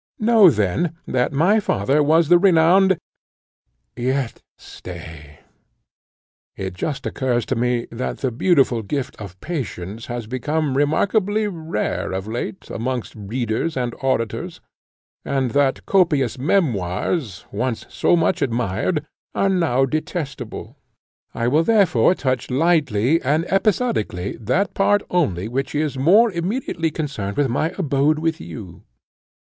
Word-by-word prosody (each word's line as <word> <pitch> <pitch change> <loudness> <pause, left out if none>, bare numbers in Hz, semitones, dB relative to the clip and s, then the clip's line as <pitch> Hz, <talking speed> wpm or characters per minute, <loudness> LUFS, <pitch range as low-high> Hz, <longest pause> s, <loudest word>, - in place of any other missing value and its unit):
Know, 220 -3 +6
then, 130 - 0
that 125 -1 0
my 175 +10 +3
father 140 - +1
was 160 +2 +4
the 175 +2 +6
renowned 190 +1 +5 1.0
yet 130 0 -2 0.2
stay; 80 -4 -11 1.1
it 95 -2 -5
just 140 - -4
occurs 125 -3 -1
to 130 - -1
me, 120 0 0
that 115 +2 -4
the 130 - -2
beautiful 130 -3 +2
gift 130 +5 -4
of 95 -3 -9
patience 115 - -5
has 120 -2 -4
become 140 +4 -1
remarkably 205 +9 +1
rare 160 - -3
of 95 +2 -4
late 110 -3 -5
amongst 125 +1 -3
readers 115 +7 -2
and 120 -2 -1
auditors, 130 -4 -2 0.6
and 135 -3 -1
that 140 -2 +1
copious 150 - +2
memoirs, 125 - -1
once 120 +2 -2
so - - +2
much 170 +2 +1
admired, 120 - -1 0.3
are 195 - +2
now 160 -9 +2
detestable: 155 +1 -5 0.6
I 115 0 0
will 150 +6 +3
therefore 185 - +4
touch 130 -5 -2
lightly 145 -2 +2
and 150 +5 +1
episodically 195 - 0
that 130 - 0
part 205 +1 +2
only 105 - 0
which 135 +4 -3
is 150 -1 0
more 195 - +5
immediately 175 -1 -2
connected 135 -11 -4
with 145 -2 +2
my 155 +7 0
abode 150 -3 +2
with 165 +1 -1
you. 95 -7 -9
135 Hz, 125 wpm, -21 LUFS, 115-170 Hz, 1.1 s, Know